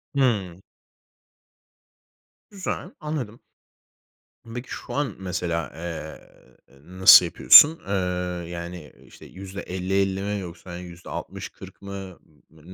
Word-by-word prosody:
Hı. 100 -10 0 1.9
Güzel. 190 -1 -5
Anladım. 145 -8 -5 1.2
Peki 120 +1 -7
şu - - -7
an 140 -7 -2
mesela, 90 -5 -3
eee, 80 -2 -7 0.5
ııı, 80 +7 -15
nasıl 95 -1 +9
yapıyorsun? 150 - +8
Iıı, 90 -2 -2
yani, 85 -3 -8
ııı, - - -20
işte - - -16
%50-50 95 0 -3
mi 105 +1 -2
yoksa 90 -1 -9
hani 90 0 -7
%60-40 85 0 -9
mı? 95 -2 -8 0.3
N 80 -1 -20
95 Hz, 105 wpm, -24 LUFS, 85-100 Hz, 1.9 s, nasıl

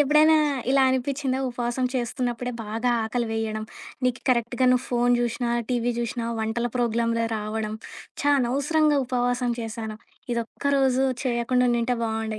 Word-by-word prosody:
ఎప్పుడైనా 305 +2 +5 0.3
ఇలా 270 0 +5
అనిపిచ్చిందా? 260 +1 -1
ఉపవాసం 240 +1 -1
చేస్తున్నప్పుడే 245 0 -2
బాగా 225 +3 -1
ఆకలి 235 +2 -1
వెయ్యడం, 220 -1 -2 0.4
నీకు 250 0 0
కరెక్ట్‌గా 245 +1 +2
నువ్వు 255 0 +2
ఫోను 245 0 +3
జూసినా, 240 0 -1 0.2
టీవీ 245 -1 +1
జూసినా 235 0 -2
వంటల 225 +2 -1
ప్రోగ్లామ్‌లే 230 -1 +1
రావడం. 215 0 -3 0.5
ఛా! 290 - +3
అనవసరంగా 285 +4 +2
ఉపవాసం 245 0 0
చేసాను. 220 -1 -5 0.4
ఇదొక్కరోజు 265 +2 +1 0.2
చేయకుండా 250 0 +1
ఉండింటే 240 +1 +1
బాగుండు. 220 -1 -2
240 Hz, 125 wpm, -25 LUFS, 230-255 Hz, 0.5 s, ఎప్పుడైనా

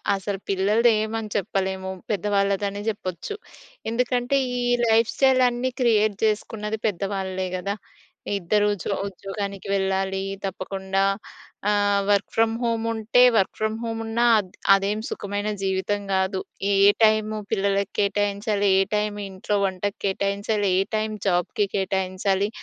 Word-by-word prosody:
అసలు 195 0 -4
పిల్లలదేమని 215 +2 +2
చెప్పలేము. 190 0 -2 0.2
పెద్దవాళ్ళది 200 0 +1
అని 200 +1 -6
చెప్పొచ్చు. 185 - -5 0.6
ఎందుకంటే 250 +2 +1 0.2
ఈ - - -1 0.3
లైఫ్ 225 0 +4
స్టైల్ 265 -1 +4
అన్ని 245 +2 -2
క్రియేట్ 215 -3 +3
చేసుకున్నది 215 0 -2
పెద్దవాళ్లే 190 -1 -2
కదా! 200 +2 -3 0.6
ఇద్దరు 205 +3 +2
ఉద్యో 200 +1 -3
ఉద్యోగానికి 195 +1 -6
వెళ్ళాలి, 190 0 0 0.2
తప్పకుండా. 190 +1 -2 0.7
ఆహ్, 205 -1 +3
వర్క్ 200 -1 +2
ఫ్రమ్ 225 0 +3
హోమ్ 230 -1 0
ఉంటే 220 +2 +2
వర్క్ 195 -4 +2
ఫ్రమ్ 215 0 -1
హోమ్ 225 -1 -3
ఉన్నా 225 +2 0
ఆహ్, 200 - -1 0.3
అదేం 200 +2 -1
సుఖమైన 205 +1 -3
జీవితం 190 +2 0
కాదు. 190 0 +1 0.3
ఏ - - +3 0.3
టైము 215 0 +3 0.2
పిల్లలకి 200 -1 0
కేటాయించాలి? 205 +1 +1
ఏ - - +5
టైం 210 0 0 0.2
ఇంట్లో 190 +2 -2
వంటకు 195 +1 -2
కేటాయించాలి? 200 +1 0
ఏ - - +4
టైం 215 0 -1 0.2
జాబ్‌కి 180 +3 +1
కేటాయించాలి? 190 +1 0
205 Hz, 125 wpm, -24 LUFS, 195-215 Hz, 0.7 s, ఏ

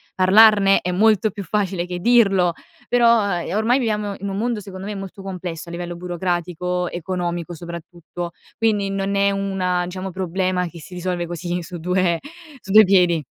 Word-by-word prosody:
parlarne 195 +1 +6
è 180 - -2
molto 215 +2 +3
più 200 - -7
facile 190 -2 -1
che 180 0 -4
dirlo, 195 -6 +4 0.3
però 235 -2 +4
uhm, 200 - -1 0.2
e 195 - -3
ormai 235 +5 +2
viviamo 210 -4 -1
in 200 0 -4
un 195 - -4
mondo, 235 0 -1
secondo 195 -1 -9
me, 210 - -4
molto 195 0 -8
complesso 180 -3 -6
a - - -8
livello 175 0 -5
burocratico, 180 0 -2
economico, 175 -1 -3
soprattutto, 170 +1 -7 0.3
quindi 210 -3 +1
non 195 0 -2
è 200 0 +3
una 190 -2 -1
diciamo 185 +1 -6
problema 185 0 -1
che 170 0 -11
si 180 +3 -12
risolve 180 -1 -2
così 175 +1 -4
su 175 +2 -8
due 180 0 +1 0.4
su 195 - -8
due 215 +1 +9
piedi. 180 -5 +3
185 Hz, 175 wpm, -21 LUFS, 175-200 Hz, 0.4 s, due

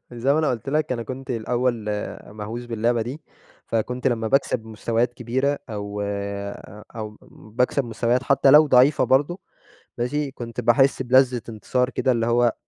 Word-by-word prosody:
زي 120 +4 +1
ما 155 - +2
أنا 155 -2 +2
قُلت 125 +1 -4
لك 150 0 0
أنا 120 -2 -3
كنت 130 +2 -7
الأول 120 0 -1 0.4
مهْوس 110 +3 -7
باللعبة 115 0 0
دي، 130 +7 -7 0.4
فكنت 125 +3 -2
لما 115 -3 0
باكسب 130 -4 +1
مستويات 115 +2 -1
كبيرة 130 +4 -1
أو 105 -1 -5
آآ، 100 +1 -6
أو 105 -1 -6
باكسب 125 +5 -1
مستويات 120 +2 0
حتى 135 0 +4
لو 150 +2 +8
ضعيفة 130 +1 +5
برضه 145 +7 +2 0.6
ماشي؟ 140 +4 -1
كنت 120 -3 -6
باحس 130 +3 +3
بلذّة 130 -1 +3
انتصار 125 +4 -1
كده 130 - +1
اللي 115 -1 0
هو 120 0 +3
120 Hz, 155 wpm, -23 LUFS, 115-130 Hz, 0.6 s, لو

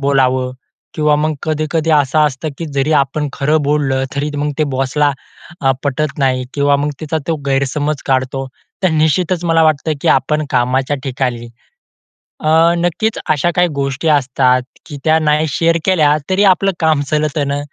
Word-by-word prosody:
बोलावं 130 -2 +1 0.4
किंवा 150 -1 +2
मग 155 +1 0
कधी-कधी 155 +1 -1
असं 150 -1 +2
असतं, 145 +2 -4
की 165 - -4
जरी 140 +3 +1
आपण 145 +2 -2
खरं 150 +3 +1
बोललं 140 -2 0
तरी 145 +2 -2
मग 145 +1 -1
ते 155 - +3
बॉसला 145 +2 +1 0.5
अ, 135 - +2
पटत 145 +2 -2
नाही 130 -2 +1
किंवा 145 0 +2
मग 145 +1 -1
तिचा 160 0 -2
तो 165 - +1
गैरसमज 140 +2 -1
काढतो 135 0 -1 0.4
तर 185 - +4
निश्चितच 160 +3 +1
मला 165 -1 +3
वाटतं, 155 0 +1
की - - 0
आपण 150 +3 +2
कामाच्या 130 +2 +1
ठिकाणी 125 -3 -3 1.0
अ, 155 - +1 0.3
नक्कीच 175 +6 -1
अशा 155 +2 +2
काही 180 0 +3
गोष्टी 140 +3 -2
असतात, 130 -3 +2 0.2
की 145 - -8
त्या 160 0 +4
नाही 155 0 +1
शेअर 165 +4 +1
केल्या 155 -6 +3
तरी 190 +2 +2
आपलं 195 +1 +1
काम 155 -3 +2
चलतं 150 -1 0
न, 140 0 -1
150 Hz, 160 wpm, -16 LUFS, 135-155 Hz, 1.0 s, तर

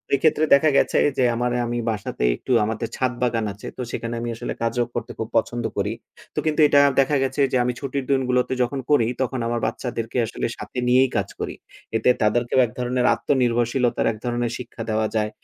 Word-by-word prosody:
এক্ষেত্রে 155 +2 +2
দেখা 155 +2 +3
গেছে - - +2 0.2
যে 130 - +3
আমার 120 +1 0 0.2
আমি 120 0 -2
বাসাতে 105 - -3
একটু - - -7
আমাদের 110 +1 -3
ছাদ 130 -1 0
বাগান 115 -3 +1
আছে। 105 - -10
তো - - -4
সেখানে 115 0 -4
আমি 120 - -3
আসলে - - -4
কাজও 120 +1 +1
করতে 120 0 -4
খুব 110 - -2
পছন্দ 120 +1 -1
করি। 105 +2 0 0.4
তো - - 0
কিন্তু 155 0 0
এটা 145 - +5 0.2
দেখা 140 +2 +3
গেছে 135 +2 -1
যে 130 - +2
আমি 125 0 0
ছুটির 140 -1 -3
দিনগুলোতে 130 -1 +1
যখন 135 +3 -3
করি, 115 -6 +4
তখন 130 0 -1
আমার 120 0 -1
বাচ্চাদেরকে 120 -1 -4
আসলে 110 - -4
সাথে - - -9
নিয়েই 130 +1 +4
কাজ 100 0 -1
করি। - - -4 0.4
এতে 125 - +2
তাদেরকেও 120 +4 +2
এক 110 - -8
ধরনের 125 0 0
আত্মনির্ভরশীলতার 120 0 +1
এক 110 - -8
ধরনের 120 -1 -1
শিক্ষা 120 -2 -9
দেওয়া 110 0 +1
যায়। 105 -1 +1
120 Hz, 195 wpm, -23 LUFS, 115-130 Hz, 0.4 s, এটা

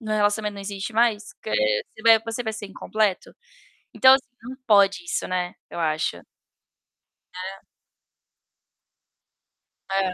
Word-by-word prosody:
o - - -14
relacionamento 210 0 +1
não 200 - -8
existe 200 +2 -5
mais, 220 -2 +1
que - - -9
você - - 0
vai 225 -1 +7
você 230 +2 -4
vai 220 -1 -3
ser 215 -1 -7
incompleto? 205 0 -2 0.6
Então 260 0 +8
assim, 265 -2 +1 0.2
não 255 +2 -7
pode 200 - +4
isso, 345 - -3
né, 180 -1 -2 0.2
eu - - -6
acho. 155 -1 -1 1.1
Né. 190 +2 -7 2.3
É. 190 -1 0
210 Hz, 130 wpm, -24 LUFS, 195-230 Hz, 2.3 s, Então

